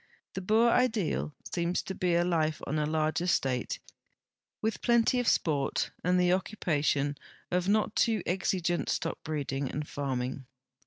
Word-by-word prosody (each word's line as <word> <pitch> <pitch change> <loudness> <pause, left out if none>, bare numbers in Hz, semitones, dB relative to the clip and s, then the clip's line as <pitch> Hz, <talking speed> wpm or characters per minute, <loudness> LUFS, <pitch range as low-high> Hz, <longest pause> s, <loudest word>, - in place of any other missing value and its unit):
The 190 - -4
Boer 220 +5 +4
ideal 220 -12 +1 0.2
seems 170 0 0
to 190 - -5
be 175 -2 +1
life 160 -3 +1
on 155 +2 -1
a 150 - 0
large 155 +1 0
estate, 135 - 0 0.8
with 220 +1 -2
plenty 235 +1 +3
of 245 - -1
sport 145 -4 +1
and 180 +1 +3
the 180 0 +3
occu})ation 150 -7 0 0.4
of 180 +1 +1
not 215 0 +2
too 220 -5 +2
exigent 180 -1 0
stockbreeding 145 -5 -2
and 150 +1 -4
farming. 130 -2 -3
170 Hz, 140 wpm, -30 LUFS, 145-190 Hz, 0.8 s, Boer